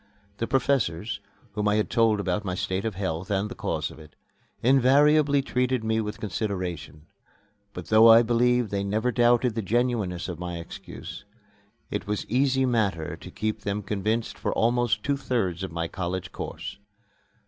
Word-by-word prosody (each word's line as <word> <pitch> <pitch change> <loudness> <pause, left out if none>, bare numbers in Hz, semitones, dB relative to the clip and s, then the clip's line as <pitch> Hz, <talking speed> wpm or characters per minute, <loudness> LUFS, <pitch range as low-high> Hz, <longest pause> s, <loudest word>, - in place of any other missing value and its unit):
The 115 - -2
professors, 120 -8 0 0.3
whom 105 0 -1
I 105 - +3
had 105 - 0
told 115 -2 +3
about 100 +1 -1
my 90 -2 -3
state 95 +2 -2
of 110 -4 -2
health 90 -2 -3
and 100 +1 0
the - - -6
cause - - -3
of - - -13
it, 75 -1 -15 0.5
invariably 140 +3 +4
treated 125 -2 0
me 110 0 +1
with 105 -1 -5
consideration; 90 -7 -4 0.7
but, - - -8
though 110 +1 +7
I 115 +1 +8
believe 120 -1 +2
they 100 -1 -1
never 110 +5 0
doubted 120 0 +3
the 115 - -2
genuineness 110 -4 0
of 90 -3 -6
my 90 -1 -4
excuse, 85 - -9 0.7
it - - -3
was 105 0 -2
easy 130 +2 +2
matter 100 -10 0
to - - -11
keep 110 0 -3
them 100 +1 -2
convinced 110 +3 -2
for - - -1
almost 120 -1 +1
two 140 0 0
thirds 115 -10 -1
of 95 -2 -4
my 85 0 -2
college 90 0 -4
course. - - -6
110 Hz, 170 wpm, -26 LUFS, 95-120 Hz, 0.7 s, I